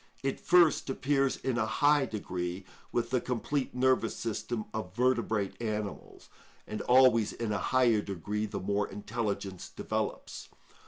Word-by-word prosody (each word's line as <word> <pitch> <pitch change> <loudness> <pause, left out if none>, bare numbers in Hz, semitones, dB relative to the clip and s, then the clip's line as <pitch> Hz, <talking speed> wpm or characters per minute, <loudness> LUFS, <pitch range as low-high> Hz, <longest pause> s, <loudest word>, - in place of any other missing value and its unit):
It 135 0 -1
first 175 -5 +4
appears 135 0 +1
in 125 -2 -1
a 110 - +1
high 145 +3 +3
degree 90 -3 -4 0.3
with 120 0 -1
the 125 -2 +2
complete 130 +2 -2
nervous 130 -3 +2
system 110 0 -3
of 100 -4 -5
vertebrate 115 -5 0
animals, 105 -3 -5 0.4
and 105 - -5
always 125 -4 +5
in 115 -2 -3
a 100 - 0
higher 120 -4 +3
degree 105 +3 -3
the - - -4
more 100 +2 0
intelligence 100 -2 -4
develops. - - -4
115 Hz, 140 wpm, -30 LUFS, 105-130 Hz, 0.4 s, always